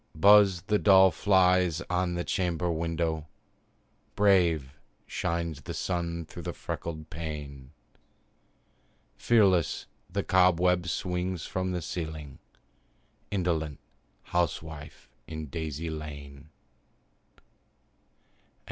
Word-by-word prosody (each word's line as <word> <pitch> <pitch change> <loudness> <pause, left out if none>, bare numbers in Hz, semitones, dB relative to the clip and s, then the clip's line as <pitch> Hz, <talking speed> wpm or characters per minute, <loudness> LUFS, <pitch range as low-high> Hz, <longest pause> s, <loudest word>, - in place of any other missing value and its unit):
Buzz 100 0 +6
the 105 -1 +1
dull 95 -2 +7
flies 90 -2 +3
on 90 0 0
the 85 - -2
chamber 85 -2 -1
window; 80 -1 -2 0.9
Brave 85 -9 +3 0.3
shines 85 -3 -3
the - - -6
sun 85 -2 -2
through - - -9
the - - -4
freckled 80 0 -6
pane; 75 -5 -6 1.5
Fearless 100 -7 +3 0.2
the - - -2
cobweb 90 -1 +3
swings 90 -1 -2
from 95 0 -2
the 90 -2 -3
ceiling 80 -4 -6 0.9
Indolent 85 -6 -1 0.5
housewife, 80 -3 -3 0.2
in 80 -1 -5
daisies 80 +1 -4
lain! 70 -1 -8 0.9
XII. - - -22
85 Hz, 95 wpm, -28 LUFS, 80-90 Hz, 1.5 s, dull